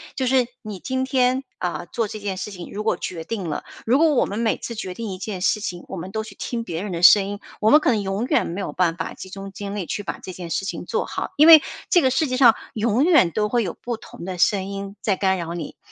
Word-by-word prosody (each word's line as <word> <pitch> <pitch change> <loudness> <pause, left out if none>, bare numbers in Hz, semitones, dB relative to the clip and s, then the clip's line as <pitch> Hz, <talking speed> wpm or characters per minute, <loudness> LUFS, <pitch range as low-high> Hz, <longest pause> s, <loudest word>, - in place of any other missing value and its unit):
就 260 - -1
是 255 -1 +3 0.2
你 210 -5 -7
今 260 0 -2
天， 255 0 +2 0.2
呃， 175 -1 -3
做 230 -2 -1
这 215 - -6
件 200 -2 -3
事 190 +3 -5
情 180 -3 -8
如 210 - -4
果 220 - +1
决 165 -3 -5
定 195 -2 -4
了， 150 - -3 0.2
如 245 +4 +4
果 320 0 +4
我 260 - +3
们 205 - -4
每 230 -1 +1
次 235 - -6
决 190 -4 -5
定 225 +2 -5
一 185 - -5
件 195 0 -5
事 210 +3 +2
情， 175 -3 -5
我 - - -6
们 185 +2 -6
都 220 0 -2
去 200 -3 -12
听 235 -2 -4
别 170 -2 -4
人 210 - -4
的 170 -1 -3
声 195 +2 +8
音， 205 0 -5 0.2
我 215 - +4
们 300 - +8
可 285 - +2
能 220 -3 +1
永 195 +3 -2
远 300 +4 +2
没 175 +4 -5
有 - - -4
办 175 -2 +1
法 165 - -4
集 190 - -10
中 195 +1 -8
精 200 0 -6
力 195 -4 -3
去 205 - -4
把 - - -5
这 185 - -8
件 175 -2 -7
事 180 +5 -1
情 - - -5
做 - - -1
好， - - -4
因 305 +2 +7
为 320 -2 +11 0.3
这 350 - +5
个 260 - +3
世 300 +4 +1
界 255 - -1
上 245 -3 +6 0.2
永 230 +5 +2
远 310 - +5
都 210 +3 0
会 240 +1 +1
有 195 - -3
不 240 -1 -3
同 210 - -11
的 185 -1 -5
声 190 +2 +2
音 200 +1 -6
在 200 - +1
干 190 0 +1
扰 170 -1 -4
你。 170 - -6
205 Hz, 305 characters per minute, -23 LUFS, 185-240 Hz, 0.3 s, 为